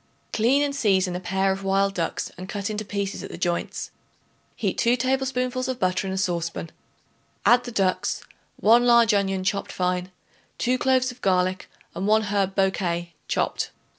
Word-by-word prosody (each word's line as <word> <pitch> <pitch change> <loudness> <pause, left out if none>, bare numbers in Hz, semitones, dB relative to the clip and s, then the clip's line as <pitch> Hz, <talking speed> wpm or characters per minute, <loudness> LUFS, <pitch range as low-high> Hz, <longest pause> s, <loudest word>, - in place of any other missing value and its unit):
Clean 255 +6 +3
and 285 -1 -1
season 190 -8 +2
a - - -2
pair 190 +1 0
of 195 +1 -3
wild 195 0 +2
ducks 170 -3 -2
and 185 +1 -9
cut 205 +1 -3
into 215 0 -3
pieces 200 -1 -3
at - - -7
the - - -7
joints. 175 -1 -2 0.6
Heat - - -2
2 235 +1 +4
tablespoonfuls 255 0 -1
of 260 -1 -3
butter 185 +1 0
in 190 - -2
a - - -3
saucepan; 170 -3 -2 0.7
add 245 +1 +5
the 245 - -5
ducks, 195 -5 0 0.4
1 230 +3 +6
large 235 -2 +5
onion 195 -2 +1
chopped 200 +1 -1
fine, 180 0 -1 0.5
2 255 +1 +1
cloves 255 0 +2
of 250 - -16
garlic 185 -1 +1 0.2
and 195 - -3
1 215 +1 +4
herb 200 -2 0
bouquet 175 -3 0
chopped. - - -1
200 Hz, 170 wpm, -24 LUFS, 185-240 Hz, 0.7 s, 1